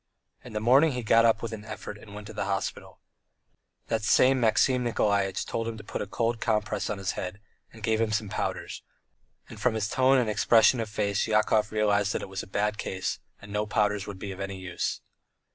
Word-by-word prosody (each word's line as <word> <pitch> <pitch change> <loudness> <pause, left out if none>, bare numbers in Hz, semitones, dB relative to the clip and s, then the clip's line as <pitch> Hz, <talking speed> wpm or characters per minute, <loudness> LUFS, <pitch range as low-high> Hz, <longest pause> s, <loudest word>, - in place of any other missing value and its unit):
In - - -11
the 105 - -1
morning 135 +7 +5
he 125 -1 -3
got 115 +1 +5
up 115 -1 +3
with 115 -1 -4
an 105 -1 -7
effort 105 -1 -7
and 105 -1 -13
went 105 0 -8
to - - -9
the - - -3
hospital. 95 0 -4 0.9
The 115 - 0
same 130 +5 +4
Maxim 125 +2 +3
Nikolaitch 100 -4 0
told 115 0 -3
him 115 -1 -4
to 105 - -10
put - - -5
a 105 - -4
cold 115 +2 -1
compress 105 -2 0
on 105 - -2
his 95 -1 -2
head, 90 +2 -5 0.3
and 110 -1 -14
gave 110 0 +1
him 110 -1 +1
some 105 0 -1
powders, - - -4 0.7
and - - -11
from 125 -3 +2
his 105 -1 0
tone 130 +3 +3
and 125 -3 +2
expression 115 +3 +4
of 110 -2 -3
face 100 -1 0
Yakov 110 0 +2
realized 105 -1 +2
that - - -2
it - - -7
was 95 0 -4
a - - -10
bad 105 +2 -1
case 95 0 -3 0.2
and 105 - -12
that - - -7
no 105 0 -1
powders 105 -1 0
would 100 -2 -6
be 95 +1 -6
any 100 +1 -5
use. 90 -1 -3
105 Hz, 220 wpm, -27 LUFS, 100-115 Hz, 0.9 s, morning